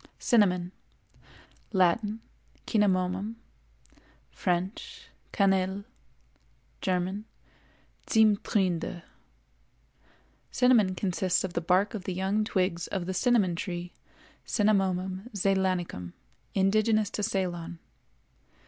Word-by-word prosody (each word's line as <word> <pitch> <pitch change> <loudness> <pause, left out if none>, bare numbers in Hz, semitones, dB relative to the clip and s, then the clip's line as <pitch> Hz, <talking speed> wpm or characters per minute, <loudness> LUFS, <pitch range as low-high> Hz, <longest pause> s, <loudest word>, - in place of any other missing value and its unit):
CINNAMON. 180 -7 +2 1.0
Latin—Cinnamomum; 200 0 0 1.0
French—Canelle; 190 +1 -1 1.0
German—Zimmtrinde. 190 -1 -1 1.5
Cinnamon 235 -7 +3
consists 185 -1 0
of 190 -2 -4
the 170 - -1
bark 185 +4 +2
of 200 -4 -6
the 185 - -3
young 195 +3 0
twigs 185 -5 -1
of 190 -3 -3
the 190 - -3
cinnamon 195 -3 +2
tree, 175 0 -5 0.5
Cinnamomum 190 -1 0
zeylanicum, 185 - 0 0.4
indigenous 215 +2 +2
to - - -3
Ceylon. 175 -4 -2
190 Hz, 70 wpm, -28 LUFS, 180-205 Hz, 1.5 s, Cinnamon